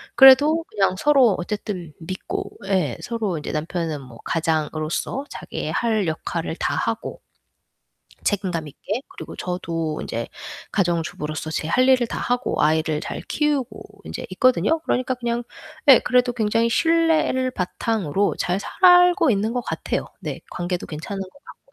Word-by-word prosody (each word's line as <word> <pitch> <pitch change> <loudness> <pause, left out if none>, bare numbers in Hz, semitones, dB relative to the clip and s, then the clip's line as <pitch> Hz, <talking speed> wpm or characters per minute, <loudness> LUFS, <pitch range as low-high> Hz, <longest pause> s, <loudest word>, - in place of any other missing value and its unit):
그래도 290 +5 +7
그냥 195 -3 +1
서로 265 -5 +4
어쨌든 180 -3 -4
믿고. 185 +3 -5 0.2
예. 180 -11 +1
서로 220 -8 -2
이제 150 - -5
남편은 160 -1 -3
뭐 125 -3 -13
가장으로서 160 - -1
자기의 - - -5
할 220 -5 +1
역할을 160 +1 -3
다하고. - - -2 1.0
책임감 185 -6 -1
있게. 205 - -4
그리고 - - -9
저도 165 -3 -3
인제 - - -4 0.5
가정주부로서 165 -4 -1
제 155 - -2
할 255 +9 +3
일을 255 -2 +5
다하고 245 0 -1
아이를 155 0 +2
잘 - - -5
키우고 295 -4 -2
인제 - - -6
있거든요. 255 +10 +3
그러니까 255 -4 0
그냥 240 -1 -2 0.4
네, 270 -4 +9
그래도 250 0 +2
굉장히 230 0 +1
신뢰를 320 -3 +2
바탕으로 200 - -1
잘 180 +2 0
살고 355 - +5
있는 215 +1 +1
것 250 - -1
같아요. - - -3 0.2
네, - - -5
관계도 175 0 -3
괜찮은 165 +6 -6
것 190 - -9 0.2
같고, - - -16
205 Hz, 310 characters per minute, -23 LUFS, 165-255 Hz, 1.0 s, 네